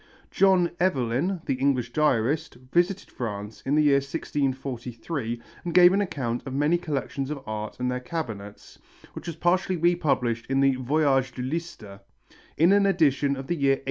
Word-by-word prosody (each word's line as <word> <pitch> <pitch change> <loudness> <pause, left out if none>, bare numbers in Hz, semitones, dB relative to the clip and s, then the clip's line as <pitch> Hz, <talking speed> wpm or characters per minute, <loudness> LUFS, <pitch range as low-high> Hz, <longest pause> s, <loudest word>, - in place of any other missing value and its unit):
John 185 -3 +3
Evelyn, 165 +1 0
the - - 0
English 130 -3 0
diarist, 150 +1 +1 0.2
visited 175 +3 +1
France 105 -3 -6
in 140 - +2
the 150 - +4
year 140 -2 +5
1643 135 -3 -3 0.2
and 170 - -4
gave 180 0 +8
an 200 - +2
account 130 -11 -2
of 130 - -4
many 150 +5 +2
collections 140 -4 -3
of 145 -3 -5
art 110 0 -5
and 125 0 0
their 125 - -2
cabinets, 115 -9 -7 0.3
which - - -9
was 170 - -4
partially 180 +2 +1
republished 145 -9 +1
in 135 0 +1
the 135 0 +4
Voyage 135 -1 +1
de 125 - -5
Lister, 130 -9 -5 0.6
in 165 +5 +5
an 200 0 +4
edition 145 -6 +2
of 135 - -6
the 175 - -1
year 140 -4 +2
1878. - - -12
140 Hz, 170 wpm, -26 LUFS, 125-170 Hz, 0.6 s, gave